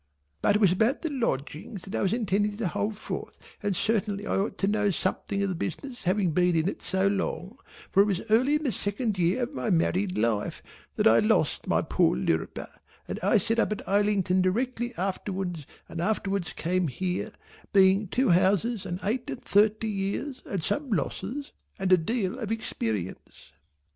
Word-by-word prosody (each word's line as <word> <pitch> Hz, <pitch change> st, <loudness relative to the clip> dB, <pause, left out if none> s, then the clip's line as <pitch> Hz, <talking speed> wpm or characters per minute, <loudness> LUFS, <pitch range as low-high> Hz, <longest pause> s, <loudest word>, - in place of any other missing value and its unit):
But 205 Hz, -, +3 dB
it -, -, +3 dB
was 200 Hz, -5 st, +5 dB
about 220 Hz, +9 st, +1 dB
the 325 Hz, -, -1 dB
Lodgings 180 Hz, -, -3 dB
that 195 Hz, -, -9 dB
I -, -, 0 dB
was 190 Hz, -, +2 dB
intending 205 Hz, -2 st, 0 dB
to 220 Hz, -4 st, -1 dB
hold 205 Hz, +5 st, -2 dB
forth -, -, -6 dB, 0.2 s
and 205 Hz, -2 st, 0 dB
certainly 210 Hz, 0 st, 0 dB
I -, -, -1 dB
ought 195 Hz, +2 st, -1 dB
to 195 Hz, -, 0 dB
know 205 Hz, 0 st, +2 dB
something 195 Hz, +2 st, -1 dB
of 200 Hz, -, 0 dB
the -, -, -1 dB
business 245 Hz, -, -5 dB
having 185 Hz, -1 st, +1 dB
been 180 Hz, +2 st, +3 dB
in 160 Hz, +1 st, +2 dB
it -, -, -3 dB
so 190 Hz, +1 st, +1 dB
long, 200 Hz, +3 st, -2 dB, 0.3 s
for 195 Hz, -, +6 dB
it 205 Hz, -, +4 dB
was 195 Hz, -2 st, -1 dB
early 255 Hz, +7 st, +4 dB
in 300 Hz, -, -1 dB
the 270 Hz, -, +1 dB
second 205 Hz, 0 st, -2 dB
year 180 Hz, +9 st, +2 dB
of 250 Hz, +5 st, -4 dB
my 225 Hz, -, -2 dB
married 185 Hz, +2 st, +1 dB
life 110 Hz, -2 st, 0 dB, 0.3 s
that -, -, 0 dB
I 115 Hz, +1 st, +7 dB
lost 105 Hz, -, +1 dB
my -, -, +2 dB
poor -, -, +2 dB
Lirriper 80 Hz, +5 st, -2 dB, 0.4 s
and -, -, -4 dB
I -, -, +4 dB
set 225 Hz, +1 st, +1 dB
up 230 Hz, -, +2 dB
at 215 Hz, -, -4 dB
Islington 200 Hz, -2 st, +2 dB
directly 240 Hz, +5 st, 0 dB
afterwards 185 Hz, -4 st, -3 dB, 0.2 s
and 165 Hz, -, -5 dB
afterwards 195 Hz, -2 st, -1 dB
came 180 Hz, +1 st, 0 dB
here, 180 Hz, +7 st, -2 dB, 0.4 s
being 195 Hz, +1 st, +5 dB
two 255 Hz, +7 st, +1 dB
houses 195 Hz, +5 st, +2 dB
and 175 Hz, +1 st, -3 dB
eight 235 Hz, +5 st, -1 dB
and -, -, -6 dB
thirty 215 Hz, +2 st, +3 dB
years 210 Hz, +7 st, -3 dB
and 190 Hz, -5 st, -3 dB
some 290 Hz, -, -1 dB
losses 240 Hz, +6 st, -2 dB, 0.3 s
and 190 Hz, -1 st, +2 dB
a -, -, +8 dB
deal 220 Hz, +5 st, -1 dB
of 220 Hz, -3 st, -4 dB
experience. 110 Hz, -, -4 dB
200 Hz, 190 wpm, -27 LUFS, 180-220 Hz, 0.4 s, a